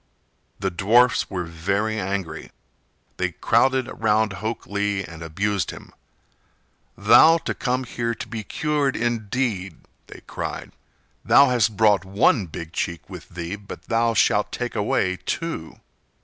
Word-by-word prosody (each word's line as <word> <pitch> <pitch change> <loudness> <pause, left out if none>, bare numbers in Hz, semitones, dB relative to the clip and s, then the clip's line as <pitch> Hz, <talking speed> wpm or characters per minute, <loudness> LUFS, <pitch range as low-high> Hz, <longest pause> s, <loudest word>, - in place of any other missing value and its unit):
The 95 -1 -2
dwarfs 115 +7 +3
were 90 -2 -3
very 100 +6 -2
angry. 95 -2 -4 0.7
They 90 -1 -1
crowded 125 +7 +2
round 110 -1 +1
Hok 110 +3 -4
Lee 100 -1 -1
and 85 -2 -10
abused 95 +2 -1
him. - - -10 1.0
"Thou 165 +1 +7
to - - -3
come 130 +1 -1
here 115 -1 -3
to 115 0 -7
be 110 0 -5
cured, 150 +1 -1
indeed!" 115 -5 -2 0.3
they - - -12
cried. - - -5 0.5
"Thou 140 -1 +6
hast 110 -4 +1
brought 105 -4 +4
one 100 +1 +2
big 80 +1 -8
cheek 85 -1 -3
with - - -10
thee, 85 +2 -5
but 100 -1 -10
thou 115 0 +1
shalt - - +2
take - - -4
away 95 0 0
two." 165 - -4
105 Hz, 135 wpm, -23 LUFS, 95-120 Hz, 1.0 s, Thou